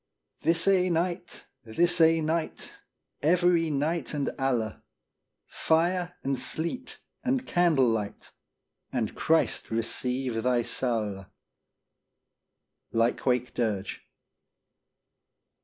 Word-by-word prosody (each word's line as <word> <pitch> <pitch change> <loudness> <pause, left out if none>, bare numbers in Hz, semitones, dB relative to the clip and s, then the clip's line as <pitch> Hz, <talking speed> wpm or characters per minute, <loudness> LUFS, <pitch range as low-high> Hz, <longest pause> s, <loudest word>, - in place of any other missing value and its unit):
This 165 +2 +2
ae 185 -2 +4
night, 175 +1 -2 0.2
this 170 +10 +2
ae 165 0 +5
night, 160 +1 -3 0.4
Every 170 +1 +3
night 150 +1 -1
and 140 -2 -1
alle, 120 -5 -1 0.6
Fire 175 +2 0
and 135 -1 0
sleet 170 +11 -3 0.2
and 260 0 0
candle 165 -7 +3
light, 110 -3 -3 0.6
And 120 -4 -1
Christ 160 0 +1
receive 125 +1 -2
thy 125 0 +2
saule. 110 -7 -2 1.6
Lykewake 125 +2 +1
Dirge. 110 -5 -2
150 Hz, 90 wpm, -28 LUFS, 120-170 Hz, 1.6 s, ae